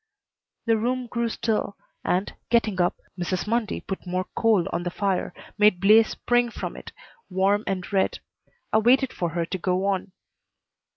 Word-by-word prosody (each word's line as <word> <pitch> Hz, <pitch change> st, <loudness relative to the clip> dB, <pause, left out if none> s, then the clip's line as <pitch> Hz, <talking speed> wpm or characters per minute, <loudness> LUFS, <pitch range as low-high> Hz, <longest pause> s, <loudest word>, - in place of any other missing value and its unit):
The 225 Hz, -1 st, +3 dB
room 250 Hz, +3 st, -1 dB
grew 235 Hz, 0 st, -2 dB
still 220 Hz, -3 st, -1 dB, 0.3 s
and, 185 Hz, +3 st, 0 dB, 0.2 s
getting 220 Hz, -5 st, +2 dB
up, 175 Hz, -, +2 dB, 0.2 s
Mrs. 180 Hz, +1 st, -1 dB
Mundy 225 Hz, -1 st, -1 dB
put 195 Hz, -1 st, -6 dB
more 185 Hz, +1 st, -1 dB
coal 220 Hz, -6 st, +3 dB
on -, -, 0 dB
the 175 Hz, -, -2 dB
fire, 195 Hz, 0 st, -1 dB, 0.3 s
made 210 Hz, -4 st, +5 dB
blaze 215 Hz, +3 st, +6 dB
spring 240 Hz, 0 st, +1 dB
from -, -, -6 dB
it, -, -, -10 dB, 0.4 s
warm 195 Hz, +3 st, +2 dB
and 185 Hz, -2 st, -2 dB
red. 190 Hz, -1 st, +2 dB, 0.6 s
I 220 Hz, -, +6 dB
waited 255 Hz, +3 st, +3 dB
for 175 Hz, -, -2 dB
her 170 Hz, +1 st, -2 dB
to 190 Hz, -, -4 dB
go 185 Hz, +2 st, 0 dB
on. 195 Hz, -1 st, -1 dB
200 Hz, 165 wpm, -25 LUFS, 185-225 Hz, 0.6 s, blaze